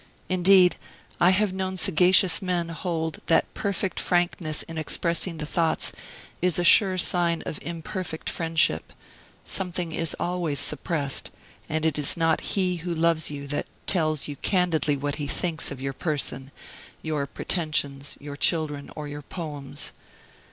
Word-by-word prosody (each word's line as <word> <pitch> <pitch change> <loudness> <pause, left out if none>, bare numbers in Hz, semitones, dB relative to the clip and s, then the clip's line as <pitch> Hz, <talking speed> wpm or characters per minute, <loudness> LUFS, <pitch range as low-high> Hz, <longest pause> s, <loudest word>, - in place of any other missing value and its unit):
Indeed, 185 0 +5 0.4
I 175 - +6
have 190 +1 +2
known 190 0 -3
sagacious 180 0 +4
men 180 -3 -1
hold 165 -1 -3
that 165 - +3
perfect 200 -2 -2
frankness 175 -3 0
in 165 -1 -6
expressing 170 +2 0
the 155 - -4
thoughts 160 +1 +1 0.5
is 180 -2 +2
a 175 - +1
sure 185 +1 +6
sign 170 -2 +1
of 150 - -4
imperfect 170 0 -5
friendship; 160 - +1 0.5
something 180 -2 -2
is 165 0 -1
always 175 -5 -1
suppressed; 145 -1 +1 0.4
and 160 +1 -1
it 160 -2 +1
is 145 +4 +3
not 165 -1 +2
he 185 -3 0
who 170 +1 -4
loves 165 -1 +2
you 140 -1 -6
that 145 - -2 0.2
"tells 155 -5 +1
you 145 - -5
candidly 170 -6 +1
what 145 +1 -3
he 145 -2 -3
thinks" 160 +1 -2
of 140 - -6
your 135 0 -3
person, 135 -3 -2 0.5
your 150 -3 -1
pretensions, 145 -3 -1
your 145 0 -7
children, 150 -2 0
or 150 -1 -5
your 145 0 -6
poems. 145 -3 -6
165 Hz, 145 wpm, -26 LUFS, 150-180 Hz, 0.5 s, I